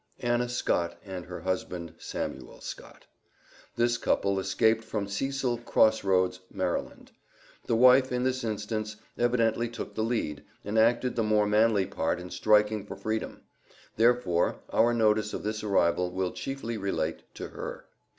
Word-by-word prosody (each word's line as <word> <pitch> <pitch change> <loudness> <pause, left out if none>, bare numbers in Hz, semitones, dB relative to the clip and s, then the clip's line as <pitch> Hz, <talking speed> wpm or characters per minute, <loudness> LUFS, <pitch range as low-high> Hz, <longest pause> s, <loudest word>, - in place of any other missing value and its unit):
Anna 120 0 +1
Scott 85 -8 0
and 95 -3 -7
husband, 90 -2 -4
Samuel 65 -1 -5
Scott. - - -9 0.7
This 120 0 +2
couple 100 -1 +1
escaped 110 +4 +2
from 105 -2 -3
Cecil 125 +3 -1
Cross 110 -2 +3
Roads, 90 -1 +2
Md. - - -3 0.6
The 115 - +2
wife, 130 +2 +6
in 125 0 0
this 130 0 0
instance, 110 0 -3 0.2
evidently 120 -1 +1
took 115 - -7
the 110 - -1
lead, 110 -11 -2 0.2
and 105 +2 +1
acted 120 +2 +3
the 115 - +1
more 105 -1 +3
manly 105 -1 +3
part 80 0 -1
in 90 0 -9
striking 105 -1 +3
for 100 - -8
freedom; 110 +3 -3 0.5
therefore, 115 -7 +2
our 120 +1 +4
notice 110 -2 +2
of - - -5
this 110 +1 -3
arrival 90 -3 +2
will 90 0 -2
chiefly 135 -4 -4
relate 95 -5 -2
to - - -6
her.. - - -7
110 Hz, 145 wpm, -28 LUFS, 95-120 Hz, 0.7 s, wife